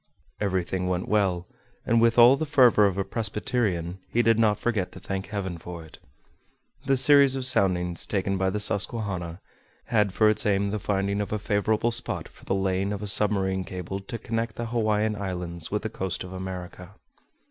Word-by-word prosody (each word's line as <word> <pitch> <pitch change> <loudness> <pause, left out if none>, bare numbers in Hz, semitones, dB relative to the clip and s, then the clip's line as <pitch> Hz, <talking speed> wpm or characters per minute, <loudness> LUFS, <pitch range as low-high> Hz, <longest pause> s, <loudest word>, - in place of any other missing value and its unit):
Everything 95 -2 -1
went 90 0 -2
well, 95 -4 +1 0.4
and 115 0 +3
with 115 0 +3
all 120 +2 +8
the 140 - -3
fervor 125 -7 +5
of 95 -1 -3
a 100 - 0
Presbyterian, 105 -5 -2
he 120 - +1
did 115 0 +3
not 105 -2 +2
forget 110 -6 -1
to - - -10
thank 95 -1 -5
heaven 95 -4 -4
for 85 -1 -9
it. 80 - -15 0.9
The 135 0 +2
series 140 0 +6
of 130 -1 +2
soundings 90 -8 +2
taken 100 -1 -1
by 95 0 0
the 105 +2 -2
Susquehanna, 100 -4 0 0.4
had 105 -3 +1
for 110 +3 +3
its 110 0 +2
aim 100 -1 +1
the 105 - -2
finding 100 0 -1
of 100 - -5
a 105 - 0
favorable 105 +3 0
spot 115 - -2
for - - -19
the - - 0
laying 95 0 -1
of 105 0 -4
a - - -4
submarine 95 -2 +1
cable 90 +1 -6
to 115 +5 -7
connect 115 0 -3
the 120 - -4
Hawaiian 110 -2 0
Islands 90 -4 -5
with 105 +1 -2
the - - -1
coast 95 -2 -4
of 90 0 -9
America. 95 0 -8
100 Hz, 190 wpm, -25 LUFS, 95-110 Hz, 0.9 s, all